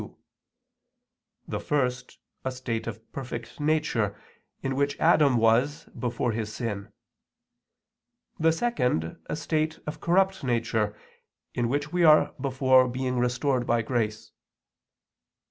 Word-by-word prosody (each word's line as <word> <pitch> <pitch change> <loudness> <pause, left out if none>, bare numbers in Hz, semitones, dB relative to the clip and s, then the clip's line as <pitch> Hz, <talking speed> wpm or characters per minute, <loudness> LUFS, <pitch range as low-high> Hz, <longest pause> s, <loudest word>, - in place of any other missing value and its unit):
2): - - -11 1.3
the - - -3
first, 125 -3 -1 0.3
a 130 - -1
state 120 -3 -4
of 110 -2 -5
perfect 120 -3 -7
nature, 150 -9 0 0.4
in 135 0 -1
which 140 +1 0
Adam 150 -6 +5
was 115 +6 +2
before 120 -1 -2
his 110 -1 -3
sin; 105 -3 -4 1.5
the 160 +1 +4
second, 125 - -1
a - - -2
state 155 0 -1
of 150 - -6
corrupt 190 +1 +2
nature, 115 -4 0 0.6
in 120 -1 0
which 145 +4 -2
we 175 -1 +2
are 155 -1 +6
before 130 -1 +4
being 125 0 -2
restored 125 +1 0
by 115 -1 +2
grace. 110 -2 -2
125 Hz, 120 wpm, -27 LUFS, 115-145 Hz, 1.5 s, are